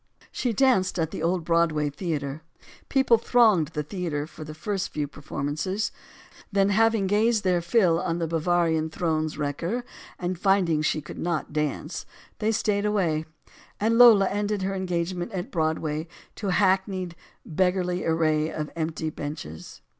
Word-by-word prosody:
She 245 - -1
danced 220 -6 +2
at 160 -2 -1
the - - -5
old 170 0 0
Broadway 160 -3 +2
Theater. 145 -3 -3 0.5
People 265 -4 +4
thronged 220 -9 +4
the 150 -1 -4
theater 150 -3 -3
for 155 0 -10
the 155 0 -8
first 195 +4 -2
few 150 -1 -3
performances. 150 +8 -3 0.6
Then, 195 0 +3
having 225 0 +3
gazed 215 +3 +2
their 180 -2 +2
fill 175 -2 +3
on 165 - -1
the 170 - -1
Bavarian 165 -1 +1
throne's 155 -2 -1
wrecker 165 - -2 0.3
and 180 -1 -3
finding 185 -6 +3
she 155 0 0
could 150 - -9
not 170 -3 -2
dance, 150 +2 -3 0.3
they 215 +1 +1
stayed 210 -2 0
away; 175 -7 +1 0.5
and 230 +3 +2
Lola 220 -5 +8
ended 205 -1 -1
her 195 +1 -1
engagement 180 +1 -2
at 180 -2 -2
the - - -22
Broad 160 -5 +1
way 155 +1 -3 0.3
to 205 - -5
the 185 - +1
hackneyed 190 -2 +1 0.3
"beggarly 180 +1 0
array 155 -1 +1
of 150 -1 -4
empty 160 -1 -2
benches." 145 - -7
175 Hz, 155 wpm, -26 LUFS, 155-195 Hz, 0.6 s, Lola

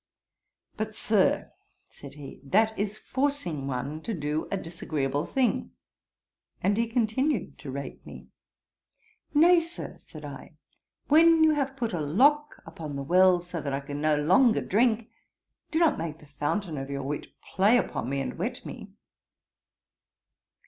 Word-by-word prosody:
'But, 215 -1 -3
Sir, 215 -3 +1 0.4
(said 140 -1 -12
he,) 145 -2 -10
that 220 +10 +2
is 205 +1 -3
forcing 260 - -2
one 140 +4 -4
to 225 +5 -4
do 150 0 -2
a 200 - -1
disagreeable 150 -5 -3
thing:' 260 -3 0 0.9
and 200 +2 +1
he 230 +2 +1
continued 240 - 0
to 140 - -8
rate 140 +1 -6
me. - - -11 1.1
'Nay, 340 +4 +7
Sir, 335 +1 -7
(said - - -12
I,) - - -9 0.5
when 325 +2 +6
you 315 - +6
have 275 -3 -1
put 235 -5 -2
a 170 - -1
lock 285 - +2
upon 150 -3 -7
the 140 - -3
well, 180 +3 +5
so 175 -1 -6
that 140 -2 -3
I 135 - 0
can 145 +1 -6
no 155 0 +3
longer 190 - +4
drink, 225 +1 +1 0.6
do 320 - -1
not 325 -3 +3
make 160 -2 -4
the 150 - -17
fountain 150 +3 -3
of 135 0 -6
your 140 -1 -3
wit 145 +2 -4
play 205 +5 +3
upon 125 - -2
me 140 0 -1
and 135 - -5
wet - - -3
me.' - - -8
185 Hz, 155 wpm, -27 LUFS, 145-245 Hz, 1.1 s, Nay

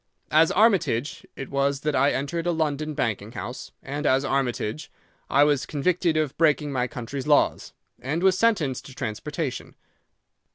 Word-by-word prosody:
As 160 +2 +5
Armitage 185 - +2
it 135 - -7
was 140 0 0
that 150 0 -1
I 140 +2 +4
entered 165 +5 -2
a - - +3
London 155 -2 -1
banking 110 -2 -2
house, 120 - -7
and 145 +2 -3
as 135 +2 +3
Armitage 135 0 -2 0.4
I 140 - +5
was 145 -2 +1
convicted 165 +2 0
of 155 -3 -1
breaking 150 -2 +2
my 125 -2 0
country's 125 +3 -6
laws, 145 -1 +2 0.3
and 150 +7 -2
was 190 -1 +5
sentenced 185 - +1
to 135 - -12
transportation. 130 +4 -4
145 Hz, 155 wpm, -25 LUFS, 130-160 Hz, 0.4 s, As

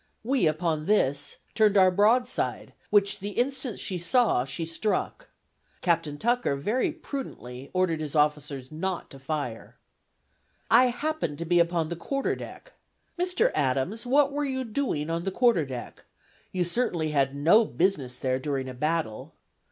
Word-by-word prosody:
We, 250 -6 +2
upon 155 0 -1
this, 145 -9 +1 0.2
turned 210 -1 +4
our 185 -1 +6
broadside, 225 +6 +1 0.2
which 200 -1 +3
the 200 +1 -5
instant 260 -2 -1
she 185 -2 -2
saw 205 - +2
she 135 +5 -4
struck. 215 - -2 0.5
Captain 160 -4 0
Tucker 240 - +1
very 210 - 0
prudently 135 - -7
ordered 180 -4 0
his 150 0 -5
officers 150 -3 0
not 180 +3 -3
to 135 - -11
fire." 135 -5 -5 0.9
"I 245 +3 +7
happened 250 - -2
to 170 - -4
be 175 +1 +3
upon 170 -2 +1
the 170 - -3
quarter 275 - -2
deck!" - - -10 0.5
Mr. 360 0 +2
Adams, 145 - 0
what 280 +2 +4
were 290 +1 -1
you 260 -2 -2
doing 215 - -2
on 165 +1 -2
the 195 - -1
quarter 200 - +2
deck? 125 -2 -8 0.5
You 180 -1 0
certainly 170 -5 0
had 140 -2 +1
no 170 +11 +5
business 165 - 0
there 130 +1 -1
during 135 -1 -2
a 130 - -6
battle. 150 -4 -2
170 Hz, 150 wpm, -27 LUFS, 145-235 Hz, 0.9 s, I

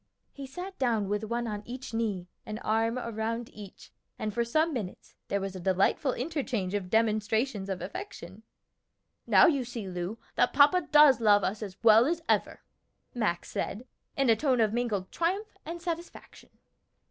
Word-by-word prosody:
He 275 -1 -8
sat 360 +8 -8
down 225 -6 +1
with 210 +1 -1
one 235 +2 -2
on 210 -2 -4
each 250 +1 -8
knee, 210 -6 -2 0.2
an 215 - -6
arm 225 +2 +1
around 230 0 -3
each, 205 -3 -12 0.3
and 215 -1 -3
for 235 +2 +1
some 310 +7 +1
minutes 210 -8 -6
there 200 - 0
was 195 -1 -5
a - - -5
delightful 190 - +1
interchange 255 - -2
of 195 -3 -2
demonstrations 220 0 +1
of 190 -2 -3
affection. 190 0 -8 0.9
"Now - - +7
you 285 -7 +3
see, 235 -4 -6
Lu, 180 +4 -4 0.2
that 245 - +2
papa 295 +6 +5
does 295 -5 +7
love 205 -2 +5
us 210 +3 -2
as 195 -3 -7
well 225 +2 +7
as 335 +1 0
ever," - - 0 0.5
Max 210 -8 -1
said, 230 +5 -3 0.3
in 275 -1 +2
a - - +5
tone 255 +1 +1
of 220 -1 +2
mingled 220 -6 -2
triumph 390 +6 -2
and 340 +1 -5
satisfaction. 340 0 -7
225 Hz, 170 wpm, -29 LUFS, 205-270 Hz, 0.9 s, Now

